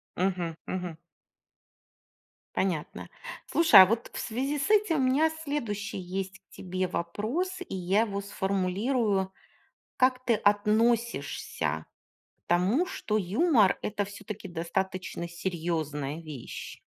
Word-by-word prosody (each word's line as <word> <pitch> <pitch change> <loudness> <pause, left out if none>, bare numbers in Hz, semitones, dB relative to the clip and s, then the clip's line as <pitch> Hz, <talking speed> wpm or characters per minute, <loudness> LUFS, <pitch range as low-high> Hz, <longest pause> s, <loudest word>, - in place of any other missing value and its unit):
Мгм, 180 -3 -1
мгм. 180 -3 -4 1.6
Понятно. 175 -6 -2 0.4
Слушай, 315 - +8
а - - +10
вот 230 +5 -1
в - - -4
связи 270 +6 -2
с 285 - -1
этим 420 -6 +4
у - - +2
меня 295 +5 +4
следующий 220 -9 -3
есть 190 +1 -4
к - - -57
тебе 185 0 -3
вопрос, 230 - -2
и - - -5
я 190 +3 +2
его 200 -3 -1
сформулирую: 195 +1 0 0.7
как 255 0 +3
ты 235 - +4
относишься 210 - +1 0.5
к - - -49
тому, 190 - +3
что 215 - -2
юмор- 215 - +3
это 205 -1 -1
всё-таки 205 0 -8
достаточно 175 +1 -3
серьёзная 160 -4 -3
вещь? 150 -7 -8
195 Hz, 115 wpm, -28 LUFS, 180-235 Hz, 1.6 s, а